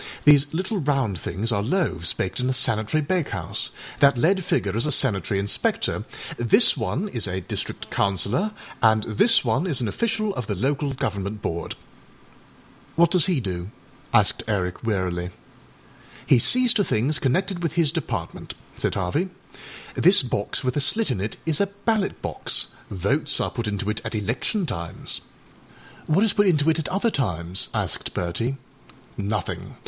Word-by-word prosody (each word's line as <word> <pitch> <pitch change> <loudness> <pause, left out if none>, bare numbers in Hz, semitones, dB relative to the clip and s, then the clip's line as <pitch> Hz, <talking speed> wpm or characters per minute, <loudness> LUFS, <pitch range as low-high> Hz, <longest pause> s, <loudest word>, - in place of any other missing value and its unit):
These 145 -1 +6
little 190 +5 -2
round 135 - 0
things 100 +10 -2
are 100 -2 +1
loaves 125 - 0
baked 95 - -3
in 125 +1 0
a - - +1
sanitary 115 +3 +1
bakehouse. 170 +1 -1 0.3
That 140 -2 +5
lead 185 +8 +2
figure 100 -9 -1
is 115 +6 +2
a - - 0
sanitary 100 - +1
inspector, 100 +1 0 0.3
this 120 - +5
one 200 - -2
is 115 - -1
a 95 0 -3
district - - -5
councillor, 100 - +1 0.3
and 110 -1 +4
this 215 - +5
one 130 +10 +1
is 150 -8 0
an 120 - -1
official 215 - -1
of 125 - -5
the 105 - -2
Local 135 +6 -1
Government 105 -6 -3
Board.â 85 0 -4 1.2
âWhat 170 0 +5
does 180 -2 +4
he 180 -7 +1
do?â 90 -5 -4 0.4
asked 105 -4 +3
Eric 95 -3 -2
wearily. 90 -5 -1 1.0
âHe 125 - +6
sees 250 - +6
to 205 - +2
things 140 - 0
connected 180 +7 0
with 165 -2 -2
his 165 -4 +2
Department,â 120 - -5 0.2
said - - -1
Harvey. 150 - -1 0.6
âThis 180 -6 +5
box 105 +3 -2
with 125 -1 -1
a 145 - +1
slit 215 - +3
in 105 -7 -2
it 105 +2 -4
is 160 0 +1
a 200 - +2
ballot 200 +1 -2
box. - - 0 0.2
Votes 140 - 0
are - - -1
put 115 -2 -4
into 100 -1 -3
it 105 0 -2
at 110 +1 -4
election 120 - -2
times.â 85 - -7
âWhat 185 +7 +4
is 225 - +2
put 205 -1 +3
into 160 -3 +3
it 160 - -1
at 160 - -2
other 205 +5 0
times?â 90 - -2
asked - - -4
Bertie. 115 +10 -2 0.6
âNothing. 105 +1 -4
130 Hz, 165 wpm, -24 LUFS, 100-170 Hz, 1.2 s, These